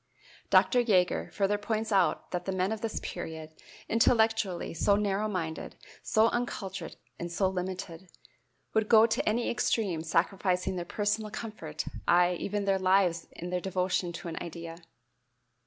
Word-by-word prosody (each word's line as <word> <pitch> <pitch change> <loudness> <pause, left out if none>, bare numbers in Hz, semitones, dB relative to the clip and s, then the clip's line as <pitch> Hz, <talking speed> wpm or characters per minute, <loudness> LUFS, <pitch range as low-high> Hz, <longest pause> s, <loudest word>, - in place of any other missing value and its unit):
Dr. 250 - +5
Jaeger 185 -7 +2
further 205 0 +1
points 220 +1 -2
out 190 -3 +2
that 180 -1 -3
the 190 - -1
men 185 +1 0
of 220 -1 -3
this 225 -1 -2
period, 160 -3 -6 0.4
intellectually 220 -5 +2
so 200 +4 +3
narrow 205 0 0
minded, 165 -6 -4 0.3
so 220 +1 +3
uncultured 195 -7 -4 0.2
and 170 0 -4
so 190 +3 +1
limited, 185 -1 -5 0.6
would 220 -1 +1
go 225 -1 +8
to 225 -1 0
any 235 +3 0
extreme, 200 -8 0
sacrificing 180 +3 0
their 175 -1 -3
personal 210 +3 -1
comfort, 210 -9 -6 0.2
aye, 175 +1 +5
even 205 0 -2
their 195 -1 +2
lives 185 -3 +2
in 175 +1 -7
their 180 0 -1
devotion 185 -1 -1
to 170 +2 -7
an 165 - -4
idea. 165 0 -7
190 Hz, 150 wpm, -29 LUFS, 175-215 Hz, 0.6 s, go